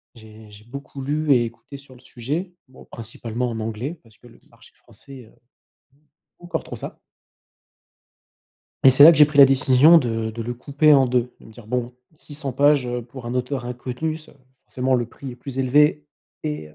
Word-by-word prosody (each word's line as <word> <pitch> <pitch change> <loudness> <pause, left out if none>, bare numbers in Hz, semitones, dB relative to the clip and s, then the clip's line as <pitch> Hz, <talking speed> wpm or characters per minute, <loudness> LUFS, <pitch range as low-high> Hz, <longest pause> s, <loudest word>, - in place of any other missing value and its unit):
j'ai 110 -1 -15
j'ai 105 +1 -16
beaucoup 140 +3 -10
lu 150 +2 -1
et 120 -3 +4
écouté 120 +4 -11
sur 135 -2 -17
le 125 - -19
sujet, 150 +9 -5
bon, 130 - -17
principalement 115 +1 -6
en 115 -1 -5
anglais 115 +9 -5
parce 110 -1 -23
que 120 - -18
le 120 - -20
marché - - -21
français, 135 -3 -15
heu, 110 - -22 0.6
c'est 135 - -33 0.4
pas 175 - -19
encore 175 - -4
trop - - -9
ça. - - -10 1.8
Et - - +9
c'est 135 +3 +7
là 165 - +10
que - - -1
j'ai 150 - +8
pris 150 -1 -8
la 140 - +11
décision 135 +4 +5
de 115 -4 -3
de 115 +1 -7
le 120 +2 -5
couper 145 +4 +2
en 135 -1 +4
2, 125 0 -1
de - - -16
me 110 - -15
dire: 110 -1 -15
«Bon, 125 +1 -3 0.2
600 145 -3 -7
pages, 140 0 +2
heu, 120 0 -4
pour 125 0 -11
un 120 - -5
auteur 125 0 -3
inconnu, 125 +6 -5
ça 155 - -17 0.3
forcément 130 +1 -2
le 120 -1 0
prix 130 +2 -10
est - - -13
plus 135 +1 -9
élevé 150 +3 +2 0.4
et 75 0 -5
heu, - - -21
125 Hz, 210 wpm, -21 LUFS, 120-145 Hz, 1.8 s, la